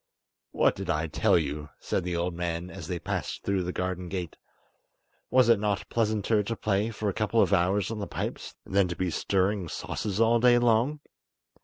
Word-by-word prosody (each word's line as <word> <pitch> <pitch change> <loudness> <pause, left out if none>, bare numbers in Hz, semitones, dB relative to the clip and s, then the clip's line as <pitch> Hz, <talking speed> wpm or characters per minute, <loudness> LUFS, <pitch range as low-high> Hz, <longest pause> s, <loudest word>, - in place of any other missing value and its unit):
"What - - +2
did - - -6
I 75 +2 +1
tell 80 - +2
you?" 75 -2 -3
said 95 - -2
the 90 0 -2
old 85 +1 -1
man, 85 +1 -3
as 80 - -8
they 90 -1 -2
passed - - -4
through 100 -1 0
the 90 0 -2
garden 90 -1 -3
gate. 90 -4 -4 0.9
"Was 130 -2 +5
it 115 -3 +5
not 105 -2 -1
pleasanter 110 -1 +1
to 115 +3 -3
play 105 0 0
for 110 -1 -4
a 100 - 0
couple 110 +2 0
of - - 0
hours 95 +2 +2
on 110 - -4
the 100 - -4
pipes - - -5
than 100 -1 +2
to 85 - -4
be 90 -1 -1
stirring 95 +1 0
sauces 105 +4 -4
all 115 +1 +4
day 120 0 +6
long? 120 +5 +2
100 Hz, 195 wpm, -28 LUFS, 90-110 Hz, 0.9 s, day